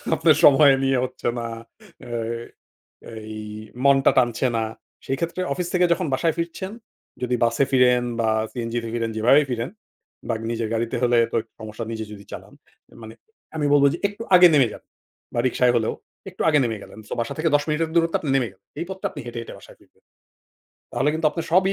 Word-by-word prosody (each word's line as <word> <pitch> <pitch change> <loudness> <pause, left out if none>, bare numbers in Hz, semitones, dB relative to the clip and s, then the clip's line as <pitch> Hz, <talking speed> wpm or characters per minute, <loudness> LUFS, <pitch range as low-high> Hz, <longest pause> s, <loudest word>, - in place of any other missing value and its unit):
আপনার 160 -2 +4
সময় 140 0 +7
নিয়ে 135 -1 +2
হচ্ছে 125 - -6
না, 115 - -4 0.6
এ্যা 120 -1 -3 0.9
এই 110 -1 -8 0.5
মনটা 140 -1 +5
টানছে 120 0 +2
না, 115 - 0 0.4
সেই 135 - -1
ক্ষেত্রে 170 +2 -3
অফিস 175 +5 -3
থেকে 180 0 +4
যখন 180 +1 0
বাসায় 160 +4 +1
ফিরছেন, 175 +3 -4 0.5
যদি 125 0 0
বাসে 115 +4 +2
ফিরেন 125 -1 +4 0.2
বা 115 - +1 0.2
সিএনজি 120 -1 -3
তে - - -4
ফিরেন, 115 -1 -1
যেভাবেই 135 +7 +4
ফিরেন 120 +2 -2 0.6
বা 115 - +1 0.2
নিজের 115 -1 -2
গাড়িতে 115 +1 -1
হলে 120 -1 +3
তো - - 0
একটু 115 - -34
সমস্যা 110 +1 -6
নিজে 110 -1 -4
যদি 100 -1 -11
চালান, - - -9 0.5
মানে 110 0 -10 0.4
আমি 150 -2 0
বলব 145 -1 +5
যে - - -4
একটু 205 +3 -9
আগে 180 0 +9
নেমে 135 -5 +5
যান - - -12 0.5
বা 120 - +1
রিক্সায় 125 0 +2
হলেও, 110 -1 0 0.4
একটু 185 - -5
আগে 150 -2 +4
নেমে 110 -3 -2
গেলেন। 110 - -12
সো, - - -9
বাসা 115 - -3
থেকে 160 +1 +1
১০ 145 - +4
মিনিটের 160 +1 0
দূরত্বে 165 -1 +2
আপনি 150 - -3
নেমে 125 -4 0
গেলেন। 100 +1 -31
এই - - -1
পথটা 190 0 -4
আপনি 145 - -8
হেঁটে, 120 0 -6
হেঁটে 115 - -9
বাসায় - - -16
ফিরবেন। - - -27 0.9
তাহলে - - +1
কিন্তু 160 0 +1
আপনার 165 +2 -5
সবই 190 +2 +4
130 Hz, 195 wpm, -23 LUFS, 115-160 Hz, 0.9 s, আগে